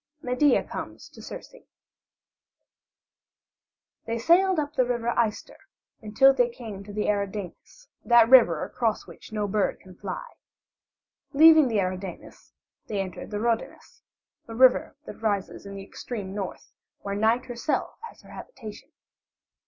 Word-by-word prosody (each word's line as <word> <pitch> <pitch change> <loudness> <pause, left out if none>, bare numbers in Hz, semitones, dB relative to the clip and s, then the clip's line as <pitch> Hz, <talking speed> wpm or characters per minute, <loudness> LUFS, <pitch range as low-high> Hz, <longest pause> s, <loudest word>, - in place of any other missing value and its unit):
MEDEA 255 +2 +2
COMES - - -8
TO - - -14
CIRCE - - -10 2.5
They 230 0 -2
sailed 355 +9 +3
up 295 -1 -2
the 260 -4 +2
River 235 -1 -2 0.2
Ister 210 - -10 0.5
until 260 +6 +4
they 245 -2 +2
came 220 -5 -9
to 205 - -11
the 210 +1 -2
Eridanus, 205 - -4 0.2
that 235 -2 +6
river 230 -11 +6
across 230 -3 -2
which - - -14
no 210 -1 -2
bird 200 0 0
can 185 - -15
fly. 185 0 -6 1.1
Leaving 315 0 +7
the 220 -4 0
Eridanus 185 0 -6 0.4
they 210 -2 -3
entered 185 -2 -5
the 210 - -4
Rhodanus, 230 0 -3 0.5
a 225 - -8
river 255 +1 +4
that - - -10
rises 200 -2 -2
in 200 - -8
the 195 - -7
extreme 200 -1 -7
north, 200 -2 -6 0.3
where 200 - -4
Night 220 +4 +1
herself 245 +4 -3
has - - -19
her - - -15
habitation. 225 - -10
225 Hz, 135 wpm, -26 LUFS, 200-250 Hz, 2.5 s, Leaving